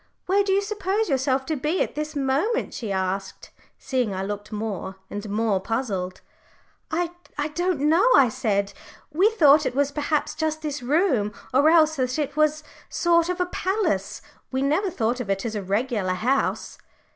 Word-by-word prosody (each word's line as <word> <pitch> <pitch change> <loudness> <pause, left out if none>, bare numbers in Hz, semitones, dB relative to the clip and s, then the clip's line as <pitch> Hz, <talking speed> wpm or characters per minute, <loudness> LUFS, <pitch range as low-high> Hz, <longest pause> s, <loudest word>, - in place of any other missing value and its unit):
Where 400 +2 +3
do 395 - -1
you 395 +1 +2
suppose 410 0 -1
yourself 265 -1 +1
to 315 - -1
be 300 +6 -1
at - - -6
this 305 +1 -4
moment?" 285 - 0
she 220 -4 -5
asked, 190 0 -3 0.3
seeing 250 -7 -1
I 190 - -3
looked 205 +1 -5
more 205 -3 -4 0.2
and 205 +1 -5
more 210 -1 +1
puzzled. 195 -4 -3 0.7
"I 345 +1 -1 0.4
don't 350 -2 0
know," 330 +10 +4
I 270 -3 +6
said. 200 -4 -1 0.4
"We 375 +7 +4
thought 305 -9 +5
it - - -4
was 285 0 +1
perhaps 295 +1 -1
just 315 0 -2
this 295 -2 -3
room, 255 - +1 0.2
or 285 +4 +5
else 315 -2 +4
that 255 0 -1
it 295 -2 -2
was 305 0 +2
a - - -29 0.3
sort 340 0 +2
of 360 0 -2
a 360 - +2
palace. 360 - -1 0.3
We 265 0 0
never 320 +8 +1
thought 240 -5 -1
of 235 -5 -5
it 195 +3 -1
as 225 - -2
a 210 - -2
regular 200 0 -1
house." 260 +8 -1
275 Hz, 180 wpm, -24 LUFS, 215-325 Hz, 0.7 s, I